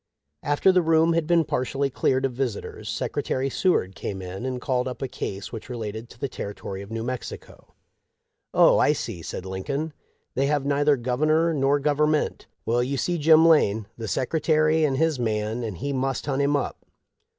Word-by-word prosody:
After 145 Hz, +6 st, +3 dB
the 185 Hz, -1 st, +4 dB
room 165 Hz, 0 st, +3 dB
had 165 Hz, -2 st, 0 dB
been 170 Hz, -1 st, +4 dB
partially 135 Hz, +2 st, -1 dB
cleared 130 Hz, +1 st, +1 dB
of 130 Hz, -, -2 dB
visitors 115 Hz, -4 st, -4 dB
Secretary 135 Hz, +3 st, -2 dB
Seward 125 Hz, -, +1 dB
came 95 Hz, 0 st, -5 dB
in 95 Hz, +6 st, -5 dB
and 130 Hz, -1 st, -3 dB
called 125 Hz, 0 st, -1 dB
up 125 Hz, -, -5 dB
a -, -, -1 dB
case 100 Hz, -5 st, -5 dB
which 115 Hz, +2 st, -8 dB
related 110 Hz, -1 st, -5 dB
to -, -, -16 dB
the 140 Hz, -, -1 dB
territory 100 Hz, -4 st, -6 dB
of 100 Hz, -, -10 dB
New 115 Hz, 0 st, -4 dB
Mexico. 125 Hz, +1 st, -7 dB, 0.4 s
' -, -, -54 dB
Oh, -, -, +6 dB
I -, -, +4 dB
see,' 85 Hz, -, -5 dB
said 90 Hz, +2 st, -6 dB
Lincoln; 140 Hz, +12 st, -3 dB, 0.2 s
' -, -, -47 dB
they 135 Hz, +2 st, +1 dB
have 145 Hz, -1 st, 0 dB
neither 145 Hz, 0 st, +3 dB
Governor 155 Hz, +7 st, +1 dB
nor 140 Hz, 0 st, +2 dB
Government. 150 Hz, +1 st, +1 dB, 0.2 s
Well, 120 Hz, +2 st, +2 dB
you 135 Hz, +3 st, -1 dB
see 175 Hz, +4 st, -1 dB
Jim 160 Hz, +2 st, +6 dB
Lane; 110 Hz, -10 st, +4 dB
the 115 Hz, -1 st, -6 dB
secretary 155 Hz, +5 st, +2 dB
is 135 Hz, -3 st, 0 dB
his 160 Hz, -2 st, +1 dB
man, 110 Hz, 0 st, -1 dB
and 105 Hz, -6 st, -4 dB
he 140 Hz, +2 st, -3 dB
must 135 Hz, 0 st, -1 dB
hunt 140 Hz, -1 st, 0 dB
him 140 Hz, +1 st, +2 dB
up.' 140 Hz, -, -3 dB
135 Hz, 190 wpm, -25 LUFS, 115-150 Hz, 0.4 s, Oh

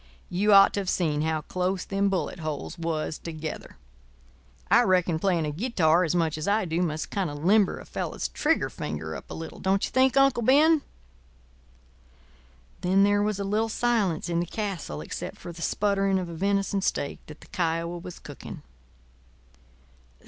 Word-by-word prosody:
You 200 Hz, +4 st, +2 dB
ought 195 Hz, -1 st, +8 dB
to -, -, -1 dB
have 190 Hz, -2 st, -2 dB
seen 155 Hz, -6 st, 0 dB
how 160 Hz, 0 st, 0 dB
close 185 Hz, +3 st, -2 dB
them 200 Hz, 0 st, 0 dB
bullet 185 Hz, -2 st, -2 dB
holes 155 Hz, -3 st, -4 dB
was 160 Hz, -2 st, -2 dB
together. 160 Hz, -2 st, -7 dB, 0.9 s
I -, -, +7 dB
reckon 180 Hz, -3 st, +2 dB
playing 175 Hz, -3 st, +1 dB
a 150 Hz, -, -2 dB
guitar 175 Hz, -, +2 dB
as 165 Hz, 0 st, 0 dB
much 160 Hz, -2 st, 0 dB
as 155 Hz, -, -4 dB
I 205 Hz, 0 st, +2 dB
do 165 Hz, +1 st, -1 dB
must 155 Hz, -3 st, -2 dB
kind 195 Hz, -5 st, -1 dB
of 145 Hz, +2 st, -7 dB
limber 200 Hz, 0 st, +4 dB
a -, -, -11 dB
fellow's -, -, -3 dB
trigger -, -, 0 dB
finger 80 Hz, +1 st, -5 dB
up -, -, -10 dB
a -, -, -6 dB
little, 160 Hz, 0 st, -8 dB
don't 195 Hz, +1 st, +1 dB
you -, -, -7 dB
think, 260 Hz, +1 st, +3 dB
Uncle 275 Hz, -3 st, +4 dB
Ben?" 295 Hz, +6 st, +5 dB, 2.0 s
Then 190 Hz, +2 st, +3 dB
there 205 Hz, 0 st, +3 dB
was 210 Hz, -1 st, 0 dB
a -, -, -1 dB
little 215 Hz, +3 st, 0 dB
silence 215 Hz, -9 st, 0 dB
in 170 Hz, -1 st, 0 dB
the 175 Hz, -, -2 dB
castle 185 Hz, -, -4 dB
except -, -, -6 dB
for 175 Hz, -, -8 dB
the 170 Hz, 0 st, -11 dB
spluttering 195 Hz, +1 st, +1 dB
of 180 Hz, -2 st, -3 dB
a -, -, -7 dB
venison 195 Hz, +3 st, 0 dB
steak 140 Hz, -6 st, -2 dB
that 155 Hz, -, -12 dB
the -, -, -15 dB
Kiowa 170 Hz, -2 st, -1 dB
was 180 Hz, 0 st, -9 dB
cooking. -, -, -10 dB
180 Hz, 180 wpm, -26 LUFS, 160-200 Hz, 2.0 s, ought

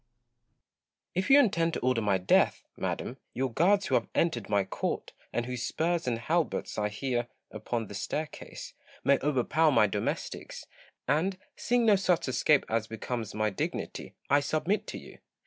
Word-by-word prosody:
Gaunt. 120 Hz, -1 st, -50 dB, 0.6 s
If 185 Hz, +7 st, -1 dB
you 275 Hz, +1 st, +9 dB
intend 170 Hz, -, +2 dB
to -, -, -1 dB
order 125 Hz, -2 st, +2 dB
my 100 Hz, -3 st, +2 dB
death, 90 Hz, -, +3 dB
madam, -, -, -3 dB, 0.2 s
your 130 Hz, -2 st, -1 dB
guards 195 Hz, -, +3 dB
who -, -, -3 dB
have -, -, +2 dB
entered 125 Hz, -, +1 dB
my 100 Hz, -1 st, +3 dB
court, 95 Hz, -, -3 dB, 0.2 s
and 120 Hz, -, -1 dB
whose 125 Hz, -1 st, -4 dB
spurs 165 Hz, +3 st, -1 dB
and 120 Hz, -2 st, +1 dB
halberts 155 Hz, 0 st, -1 dB
I 105 Hz, 0 st, 0 dB
hear 120 Hz, +2 st, -2 dB, 0.2 s
upon 115 Hz, -2 st, -3 dB
the 100 Hz, -, -10 dB
staircase, 150 Hz, +10 st, -5 dB, 0.3 s
may 140 Hz, +1 st, +4 dB
overpower 150 Hz, +3 st, +2 dB
my 120 Hz, -, +5 dB
domestics; 105 Hz, 0 st, -3 dB, 0.4 s
and, 165 Hz, +8 st, +1 dB, 0.2 s
seeing 240 Hz, 0 st, +1 dB
no 210 Hz, -3 st, +6 dB
such 180 Hz, -5 st, +1 dB
escape 140 Hz, +3 st, +3 dB
as 110 Hz, -1 st, 0 dB
becomes 110 Hz, -1 st, -4 dB
my 110 Hz, 0 st, +1 dB
dignity, 95 Hz, -, -4 dB
I 145 Hz, -, +5 dB
submit 155 Hz, +8 st, 0 dB
to -, -, -5 dB
you. -, -, -12 dB
130 Hz, 165 wpm, -29 LUFS, 115-165 Hz, 0.6 s, you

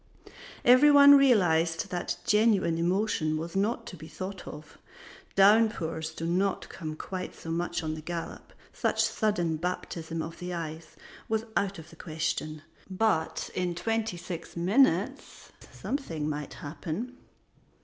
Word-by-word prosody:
Every 255 Hz, +4 st, +7 dB
one 285 Hz, 0 st, +9 dB
realized 175 Hz, -, +3 dB
that 175 Hz, -1 st, -2 dB
genuine 210 Hz, -6 st, +3 dB
emotion 175 Hz, -3 st, 0 dB
was 165 Hz, +3 st, -6 dB
not 205 Hz, +5 st, 0 dB
to -, -, -8 dB
be 160 Hz, -1 st, -11 dB
thought 185 Hz, +2 st, -7 dB
of; 150 Hz, 0 st, -10 dB, 0.6 s
downpours 195 Hz, -6 st, +3 dB
do 165 Hz, +1 st, -6 dB
not 185 Hz, +3 st, 0 dB
come 155 Hz, -3 st, -6 dB
quite 185 Hz, +3 st, -6 dB
so 165 Hz, -, -7 dB
much 175 Hz, +1 st, -2 dB
on 155 Hz, -1 st, -2 dB
the 155 Hz, -, -6 dB
gallop; 170 Hz, +1 st, -6 dB, 0.2 s
such -, -, +1 dB
sudden 175 Hz, -7 st, 0 dB
baptism 165 Hz, -1 st, -4 dB
of 165 Hz, -, -8 dB
the 180 Hz, 0 st, -4 dB
eyes 160 Hz, -1 st, -7 dB, 0.3 s
was 220 Hz, 0 st, 0 dB
out 200 Hz, -1 st, 0 dB
of 160 Hz, +1 st, -12 dB
the -, -, -14 dB
question; 155 Hz, -2 st, -3 dB, 0.3 s
but 185 Hz, -4 st, 0 dB
in 180 Hz, -1 st, -1 dB
twenty 225 Hz, +1 st, -1 dB
six 175 Hz, -1 st, -7 dB
minutes 210 Hz, +11 st, +1 dB, 0.2 s
something 165 Hz, -, -4 dB
might 150 Hz, -1 st, -4 dB
happen. 170 Hz, -, -6 dB
175 Hz, 140 wpm, -28 LUFS, 160-210 Hz, 0.6 s, one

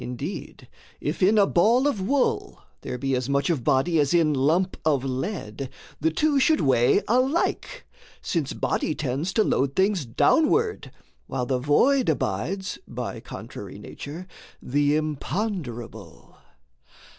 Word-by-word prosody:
Indeed, 125 Hz, -1 st, -6 dB, 0.3 s
if 150 Hz, +6 st, -3 dB
in 200 Hz, +4 st, +4 dB
a 205 Hz, -, +6 dB
ball 225 Hz, +9 st, +3 dB
of 280 Hz, -9 st, 0 dB
wool 265 Hz, +8 st, 0 dB, 0.2 s
there 125 Hz, -, -5 dB
be 135 Hz, +1 st, -1 dB
As 125 Hz, +1 st, -2 dB
much 140 Hz, +3 st, +1 dB
of 145 Hz, -8 st, -2 dB
body 155 Hz, +7 st, +2 dB
as 145 Hz, +3 st, +2 dB
in 160 Hz, -3 st, +3 dB
lump 160 Hz, +8 st, +1 dB
of 145 Hz, -4 st, +1 dB
lead, 135 Hz, -, -4 dB, 0.3 s
The 160 Hz, -, +2 dB
two 290 Hz, -, +2 dB
should 310 Hz, +4 st, +3 dB
weigh 130 Hz, -, +3 dB
alike, 270 Hz, -, 0 dB, 0.3 s
since 160 Hz, -6 st, -2 dB
body 155 Hz, -, -1 dB
tends 150 Hz, +4 st, -2 dB
To 220 Hz, -, +3 dB
load 140 Hz, -7 st, 0 dB
things 190 Hz, -3 st, +2 dB
downward, 405 Hz, -, +2 dB, 0.4 s
while 130 Hz, -2 st, -2 dB
the 130 Hz, 0 st, 0 dB
void 245 Hz, -, +3 dB
abides, 160 Hz, -, -2 dB
By -, -, -5 dB
contrary -, -, -9 dB
nature, 160 Hz, +6 st, -8 dB, 0.3 s
the 145 Hz, +2 st, +1 dB
imponderable. 155 Hz, -, -4 dB
155 Hz, 135 wpm, -25 LUFS, 135-210 Hz, 0.4 s, a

